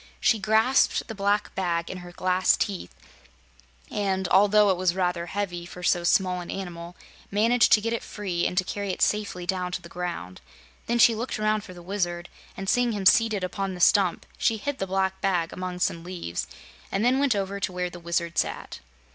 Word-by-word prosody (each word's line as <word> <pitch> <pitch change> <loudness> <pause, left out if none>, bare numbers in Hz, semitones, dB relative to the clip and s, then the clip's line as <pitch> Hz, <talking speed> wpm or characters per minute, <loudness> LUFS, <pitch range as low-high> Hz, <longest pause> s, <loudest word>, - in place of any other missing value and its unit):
She 225 - +3
grasped 220 +6 +3
the 225 - -5
black 205 0 0
bag 170 -3 -1
in 185 - -6
her 175 0 -10
glass 185 +1 +2
teeth, 195 - -3 1.0
and 190 -2 -1
although 205 +1 +5
it - - +2
was 180 -1 +1
rather 180 -2 -1
heavy 180 -3 -3
for 180 +1 -10
so 175 0 +2
small 180 +1 +2
an 175 - -9
animal, 175 -2 -6 0.3
managed 230 +4 +3
to 210 - +6
get 230 +2 -1
it 230 - -2
free 185 -5 -2
and 180 - -5
to 185 - +4
carry 200 +2 -4
it - - -1
safely 205 -4 0
down 180 0 -2
to - - -1
the 170 - -11
ground. 170 - -5 0.5
Then 235 - +1
she 235 0 +6
looked 230 +3 -3
around 215 0 +1
for 185 -4 -11
the 175 - -11
Wizard 175 -2 -3 0.3
and 195 - -5
seeing 245 +2 +2
him 200 -2 -3
seated 215 0 +4
upon 190 +1 -3
the - - -9
stump 185 0 +3
she 225 -2 +2
hid 285 +6 -4
the 195 - -2
black 190 0 -1
bag 180 -4 0
among 185 -1 -5
some 170 -2 -1
leaves 175 - -5 0.4
and 195 +3 0
then 255 +2 +3
went 280 -5 +2
over 200 0 -2
to 190 - -2
where 180 0 -3
the 175 - -9
Wizard 170 0 -1
sat. - - -3
190 Hz, 205 wpm, -26 LUFS, 180-210 Hz, 1.0 s, to